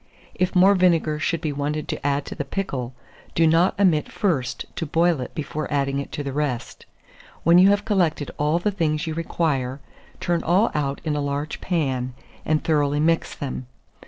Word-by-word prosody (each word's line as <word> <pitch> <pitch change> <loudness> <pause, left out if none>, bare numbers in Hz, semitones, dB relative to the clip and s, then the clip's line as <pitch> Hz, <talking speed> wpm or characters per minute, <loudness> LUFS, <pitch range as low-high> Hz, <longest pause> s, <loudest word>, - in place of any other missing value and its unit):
If 185 +1 -1
more 190 +2 +7
vinegar 170 -5 +2
should 165 +1 -1
be 155 -3 -1
wanted 145 +2 -2
to - - -4
add 140 0 0
to - - -6
the - - -3
pickle, 135 -7 -4 0.4
do 165 - +4
not 165 +5 +3
omit 175 -7 +3
first 135 -11 -1
to 165 - -2
boil 165 -1 +2
it - - -7
before 155 -1 -4
adding 140 -1 0
it 140 - -6
to 145 - -3
the 140 -1 -4
rest. 135 -5 -3 0.6
When 170 +2 +6
you 190 +2 +7
have 205 0 +2
collected 175 -9 +1
all 150 +3 +2
the 205 +4 0
things 160 -4 0
you 160 - -3
require, 150 -5 -1 0.4
turn 175 -1 0
all 190 +7 +3
out 140 -2 -2
in 155 -2 -1
a 145 - -1
large 145 +1 -3
pan, 130 -8 -1 0.3
and 155 0 +1
thoroughly 145 -2 +1
mix 165 +2 +1
them. 130 -3 -5
155 Hz, 190 wpm, -23 LUFS, 140-170 Hz, 0.6 s, more